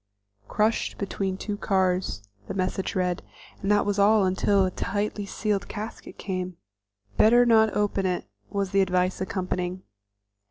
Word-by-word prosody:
"Crushed 215 Hz, +2 st, 0 dB
between 195 Hz, -1 st, -2 dB
two 205 Hz, +1 st, -4 dB
cars," 185 Hz, -, 0 dB, 0.2 s
the -, -, -5 dB
message 190 Hz, 0 st, -1 dB
said, 180 Hz, -1 st, 0 dB, 0.4 s
and 195 Hz, -, -2 dB
that 210 Hz, 0 st, +4 dB
was 205 Hz, 0 st, 0 dB
all 205 Hz, 0 st, +5 dB
until 190 Hz, +1 st, +2 dB
a 185 Hz, -, -1 dB
tightly 205 Hz, +2 st, -2 dB
sealed 205 Hz, 0 st, -1 dB
casket 215 Hz, +2 st, -7 dB
came. 185 Hz, -2 st, -4 dB, 0.6 s
"Better 240 Hz, +3 st, +6 dB
not 220 Hz, -2 st, +4 dB
open 205 Hz, -2 st, +1 dB
it," 180 Hz, -1 st, -2 dB, 0.2 s
was 200 Hz, -2 st, -2 dB
the 195 Hz, -, +4 dB
advice 185 Hz, 0 st, +1 dB
accompanying. 185 Hz, -1 st, -3 dB
195 Hz, 145 wpm, -26 LUFS, 185-210 Hz, 0.6 s, Better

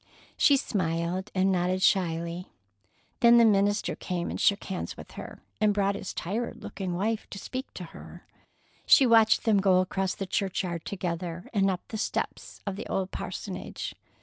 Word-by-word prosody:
She 280 Hz, -, +5 dB
smiled 180 Hz, -, -1 dB
and 190 Hz, +1 st, +3 dB
nodded 185 Hz, +1 st, +1 dB
shyly. 170 Hz, -2 st, +1 dB, 0.7 s
Then 235 Hz, -1 st, +7 dB
the 235 Hz, -, +7 dB
minister 205 Hz, 0 st, +2 dB
came 175 Hz, -2 st, -3 dB
and -, -, -4 dB
shook 200 Hz, 0 st, +3 dB
hands 190 Hz, -2 st, -5 dB
with -, -, -11 dB
her, -, -, -9 dB, 0.2 s
and 210 Hz, -2 st, +3 dB
brought 200 Hz, -1 st, +2 dB
his 200 Hz, -1 st, -5 dB
tired 220 Hz, +7 st, -4 dB
looking 185 Hz, -3 st, -4 dB
wife 215 Hz, +4 st, -1 dB
to -, -, -7 dB
speak 255 Hz, +6 st, -6 dB
to -, -, -6 dB
her. -, -, -12 dB, 0.6 s
She 275 Hz, -, +8 dB
watched 225 Hz, -2 st, +5 dB
them 215 Hz, -3 st, +4 dB
go 190 Hz, -2 st, +4 dB
across 190 Hz, 0 st, -1 dB
the 195 Hz, -, -4 dB
churchyard 180 Hz, -3 st, -2 dB
together, 175 Hz, -2 st, -4 dB
and 195 Hz, -2 st, +3 dB
up 185 Hz, -2 st, -3 dB
the 220 Hz, -, -4 dB
steps -, -, -3 dB
of 200 Hz, -1 st, -3 dB
the 220 Hz, -, -6 dB
old 190 Hz, -1 st, -2 dB
parsonage. -, -, -5 dB
195 Hz, 170 wpm, -28 LUFS, 180-210 Hz, 0.7 s, She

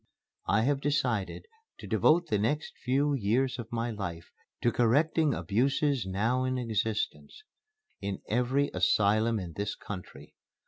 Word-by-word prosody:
I 110 Hz, +2 st, +3 dB
have 140 Hz, +2 st, +1 dB
decided 130 Hz, -, -1 dB, 0.3 s
to -, -, -10 dB
devote 170 Hz, +3 st, +3 dB
the 105 Hz, -8 st, 0 dB
next 145 Hz, +9 st, -1 dB
few 140 Hz, +3 st, +1 dB
years 125 Hz, +2 st, +1 dB
of 115 Hz, -1 st, -7 dB
my 115 Hz, 0 st, -1 dB
life 90 Hz, -6 st, -6 dB, 0.3 s
to 120 Hz, -, +4 dB
correcting 145 Hz, +5 st, +2 dB
abuses 135 Hz, +1 st, +1 dB
now 115 Hz, +7 st, 0 dB
in 130 Hz, 0 st, -1 dB
existence 115 Hz, -, -2 dB, 0.6 s
in 100 Hz, -1 st, -3 dB
every 125 Hz, +5 st, +1 dB
asylum 105 Hz, +5 st, +3 dB
in 85 Hz, -3 st, -6 dB
this 100 Hz, +3 st, -3 dB
country. 90 Hz, -8 st, -9 dB
120 Hz, 135 wpm, -29 LUFS, 105-135 Hz, 0.6 s, to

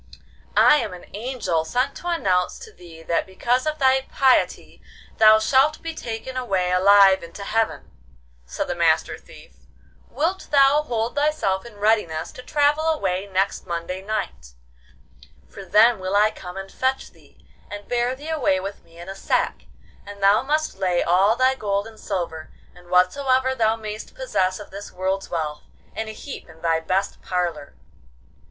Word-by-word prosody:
'I 300 Hz, -, +7 dB
am 210 Hz, -9 st, -3 dB
an 180 Hz, -, -11 dB
angel 210 Hz, -8 st, -2 dB
sent 250 Hz, +11 st, -1 dB
to 350 Hz, -, -8 dB
announce 185 Hz, -, 0 dB
to 445 Hz, -2 st, -12 dB
thee 165 Hz, -2 st, -14 dB
that 170 Hz, +2 st, -1 dB
because 245 Hz, +8 st, 0 dB
of 305 Hz, 0 st, -1 dB
thy 265 Hz, -1 st, +3 dB
piety 265 Hz, -2 st, +1 dB, 0.4 s
thou 215 Hz, 0 st, +8 dB
shalt 265 Hz, +7 st, +2 dB
be 330 Hz, 0 st, -4 dB
taken 240 Hz, -2 st, -6 dB
away 190 Hz, -8 st, -1 dB
alive 195 Hz, +1 st, +6 dB
into 170 Hz, +4 st, -9 dB
heaven,' 220 Hz, +2 st, -2 dB, 0.5 s
said -, -, -4 dB
the -, -, -2 dB
Master -, -, +1 dB
Thief. -, -, -16 dB, 0.6 s
'Wilt 335 Hz, +8 st, -2 dB
thou 280 Hz, +1 st, +5 dB
hold 235 Hz, -5 st, -2 dB
thyself 285 Hz, -10 st, 0 dB
in 235 Hz, -, -14 dB
readiness 205 Hz, -7 st, 0 dB
to -, -, -11 dB
travel 295 Hz, +3 st, +1 dB
away 195 Hz, -, -1 dB
next 195 Hz, +1 st, -1 dB
Monday 170 Hz, +2 st, -4 dB
night? 195 Hz, -, -5 dB, 0.9 s
for 195 Hz, -, -11 dB
then 210 Hz, +4 st, +4 dB
will 185 Hz, +1 st, -3 dB
I 210 Hz, +1 st, +4 dB
come 180 Hz, +1 st, -10 dB
and 195 Hz, 0 st, -7 dB
fetch 260 Hz, +1 st, -2 dB
thee, -, -, -24 dB, 0.2 s
and 205 Hz, 0 st, -8 dB
bear 245 Hz, +1 st, 0 dB
thee 295 Hz, +4 st, -9 dB
away 285 Hz, -12 st, +1 dB
with 195 Hz, +2 st, -7 dB
me 165 Hz, -, -20 dB
in 175 Hz, +1 st, -10 dB
a 195 Hz, -, -5 dB
sack, 195 Hz, -, -1 dB, 0.4 s
and 200 Hz, -1 st, -10 dB
thou 200 Hz, +2 st, +5 dB
must 305 Hz, -3 st, -1 dB
lay 180 Hz, -2 st, +1 dB
all 190 Hz, +6 st, +3 dB
thy 255 Hz, +2 st, +3 dB
gold 200 Hz, -5 st, -2 dB
and 225 Hz, -1 st, -13 dB
silver, 170 Hz, -5 st, -4 dB, 0.2 s
and 175 Hz, 0 st, -18 dB
whatsoever 260 Hz, +9 st, +2 dB
thou 225 Hz, -3 st, +1 dB
may'st 215 Hz, -, -8 dB
possess 200 Hz, -, -1 dB
of 205 Hz, -, -11 dB
this 200 Hz, +1 st, -9 dB
world's 190 Hz, +1 st, -3 dB
wealth, 155 Hz, -3 st, -3 dB, 0.3 s
in 220 Hz, -, -4 dB
a -, -, -5 dB
heap 265 Hz, +1 st, -9 dB
in 160 Hz, +1 st, -17 dB
thy 165 Hz, -1 st, +2 dB
best 185 Hz, +4 st, -2 dB
parlour. 170 Hz, -, -3 dB
205 Hz, 170 wpm, -23 LUFS, 185-260 Hz, 0.9 s, thou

